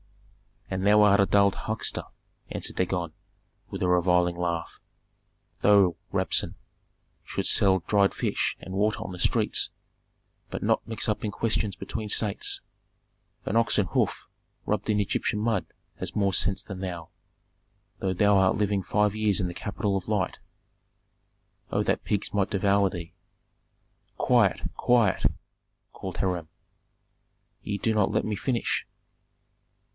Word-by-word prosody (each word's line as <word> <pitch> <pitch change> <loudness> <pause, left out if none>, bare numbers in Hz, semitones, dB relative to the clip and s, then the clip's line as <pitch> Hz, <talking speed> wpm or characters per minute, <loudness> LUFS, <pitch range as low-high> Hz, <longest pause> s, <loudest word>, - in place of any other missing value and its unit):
"And 95 +1 -1
thou 105 +1 +6
art 100 -1 +5
a 100 - +5
dull 100 -1 +4
huckster," 110 +3 -2 0.5
answered - - -4
Dagon, 90 -3 -1 0.6
with - - -4
a - - +2
reviling 90 0 +3
laugh. 85 -1 -3 0.8
"Thou, 100 -4 +5 0.2
Rabsun, - - 0 0.7
shouldst - - 0
sell 95 -2 +4
dried 100 0 +3
fish - - -1
and 95 - -8
water 105 +3 +1
on - - -6
the 90 - -8
streets, - - +2 0.8
but - - -5
not - - +1
mix 110 -2 -3
up 105 - -1
in - - -1
questions 110 -2 -1
between 110 +2 -5
states. 105 -1 0 0.8
An 110 - 0
ox 115 -2 +2
hoof 100 -4 0 0.4
rubbed 105 0 -1
in 105 -1 +2
Egyptian 105 +1 -1
mud 110 -3 0 0.3
has - - -3
more 100 -2 +1
sense 100 +2 +1
than 95 -3 -8
thou, 90 -4 -5 0.9
though 95 -1 -1
thou 100 +2 +4
art 95 -1 +4
living 100 -1 +1
five 105 +2 +1
years 110 -2 +1
in 90 - 0
the 90 - -5
capital 100 +1 -2
of 95 - -6
light! 105 -4 -1 1.3
Oh - - 0
that - - -1
pigs 105 -1 -1
might 100 -2 +1
devour 100 -1 +2
thee!" 85 -2 -7 1.0
"Quiet! - - +3 0.2
quiet!" 120 -6 +3 0.7
called 95 -2 -7
Hiram. 90 -4 -1 1.1
"Ye 100 - -3
do 110 +2 0
not 105 -3 +2
let - - +1
me 105 -1 -2
finish." 120 +2 -1
100 Hz, 140 wpm, -27 LUFS, 95-105 Hz, 1.3 s, thou